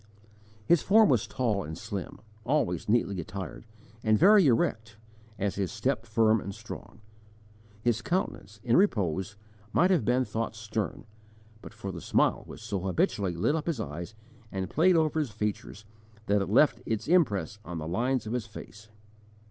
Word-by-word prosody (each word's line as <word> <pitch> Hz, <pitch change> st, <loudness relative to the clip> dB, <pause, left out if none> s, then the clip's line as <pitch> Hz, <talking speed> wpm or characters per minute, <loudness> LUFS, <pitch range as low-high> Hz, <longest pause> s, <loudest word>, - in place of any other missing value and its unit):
His 170 Hz, +4 st, +4 dB
form 215 Hz, 0 st, +5 dB
was 125 Hz, -6 st, +2 dB
tall 110 Hz, -6 st, -1 dB
and 80 Hz, +1 st, -7 dB
slim, 95 Hz, +1 st, -6 dB, 0.2 s
always 110 Hz, -, 0 dB
neatly 100 Hz, -5 st, +1 dB
attired, 95 Hz, +6 st, -7 dB, 0.4 s
and 110 Hz, -1 st, +4 dB
very 200 Hz, -, +6 dB
erect, 115 Hz, -2 st, 0 dB, 0.4 s
and 100 Hz, -1 st, -1 dB
his 95 Hz, -3 st, -2 dB
step 125 Hz, -4 st, -1 dB
firm 110 Hz, -1 st, +3 dB
and 100 Hz, 0 st, -6 dB
strong. 110 Hz, -, -10 dB, 0.8 s
His 120 Hz, -1 st, +1 dB
countenance, 105 Hz, -, -3 dB
in 120 Hz, -, +2 dB
repose, 100 Hz, -, +1 dB, 0.3 s
might 180 Hz, -, +3 dB
have 175 Hz, -10 st, +3 dB
been 125 Hz, +3 st, +2 dB
thought 115 Hz, -1 st, -3 dB
stern, 110 Hz, -2 st, -4 dB, 0.6 s
but -, -, -10 dB
for 105 Hz, -3 st, -6 dB
the 85 Hz, -3 st, -7 dB
smile -, -, +2 dB
which -, -, -10 dB
so 100 Hz, -, -2 dB
habitually 95 Hz, 0 st, 0 dB
lit 90 Hz, -, +1 dB
up 160 Hz, 0 st, -3 dB
his 160 Hz, -8 st, -1 dB
eyes 85 Hz, +4 st, -6 dB, 0.4 s
and 95 Hz, -2 st, -4 dB
played 180 Hz, +4 st, +4 dB
over 160 Hz, -1 st, +2 dB
his 150 Hz, -5 st, -1 dB
features 105 Hz, 0 st, -4 dB, 0.4 s
that 100 Hz, -1 st, +2 dB
it 95 Hz, -, -3 dB
left 125 Hz, +2 st, +4 dB
its 110 Hz, 0 st, -2 dB
impress 105 Hz, -, +2 dB
on 85 Hz, 0 st, -6 dB
the 80 Hz, -1 st, -5 dB
lines 125 Hz, +9 st, 0 dB
of 110 Hz, -, -4 dB
his 125 Hz, -2 st, -2 dB
face. 110 Hz, 0 st, -11 dB
110 Hz, 165 wpm, -28 LUFS, 100-130 Hz, 0.8 s, very